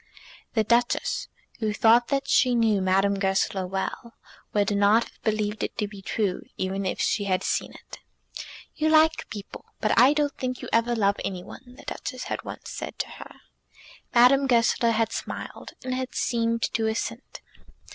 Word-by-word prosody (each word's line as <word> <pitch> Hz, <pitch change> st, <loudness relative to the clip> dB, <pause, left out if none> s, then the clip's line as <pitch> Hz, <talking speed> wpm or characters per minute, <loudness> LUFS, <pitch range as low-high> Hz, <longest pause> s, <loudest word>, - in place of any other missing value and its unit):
The 220 Hz, -, +3 dB
Duchess, 235 Hz, +2 st, +1 dB, 0.3 s
who 215 Hz, -2 st, -1 dB
thought 230 Hz, +3 st, +5 dB
that 275 Hz, -1 st, -1 dB
she 250 Hz, -3 st, +4 dB
knew 220 Hz, -4 st, +3 dB
Madame 195 Hz, +1 st, +2 dB
Goesler 190 Hz, -1 st, 0 dB
well, 195 Hz, +5 st, -4 dB, 0.4 s
would 205 Hz, 0 st, +1 dB
not 205 Hz, +3 st, +4 dB
have -, -, -17 dB
believed 215 Hz, -1 st, -1 dB
it -, -, -4 dB
to 210 Hz, -, -1 dB
be 200 Hz, -1 st, -11 dB
true, 195 Hz, -2 st, -1 dB, 0.2 s
even 190 Hz, +1 st, -2 dB
if -, -, -3 dB
she 205 Hz, -, +1 dB
had 185 Hz, -1 st, 0 dB
seen -, -, -1 dB
it. -, -, -12 dB, 0.7 s
"You 315 Hz, 0 st, 0 dB
like 315 Hz, 0 st, +4 dB
people, 205 Hz, -3 st, -8 dB, 0.2 s
but 215 Hz, -, +1 dB
I 260 Hz, +4 st, +7 dB
don't 295 Hz, -2 st, 0 dB
think 255 Hz, -1 st, -3 dB
you -, -, -6 dB
ever 230 Hz, +1 st, +2 dB
love 200 Hz, -2 st, +2 dB
any 185 Hz, -2 st, -4 dB
one," 245 Hz, +4 st, -13 dB
the -, -, -13 dB
Duchess 255 Hz, -2 st, -5 dB
had -, -, -4 dB
once -, -, -8 dB
said -, -, -6 dB
to -, -, -3 dB
her. -, -, -11 dB, 0.8 s
Madame 265 Hz, +3 st, +5 dB
Goesler 235 Hz, -1 st, +3 dB
had 225 Hz, 0 st, +1 dB
smiled, -, -, -6 dB
and 255 Hz, 0 st, -3 dB
had 255 Hz, 0 st, -4 dB
seemed 230 Hz, -1 st, 0 dB
to 225 Hz, -1 st, +1 dB
assent. 230 Hz, +2 st, -4 dB
225 Hz, 175 wpm, -26 LUFS, 200-245 Hz, 0.8 s, I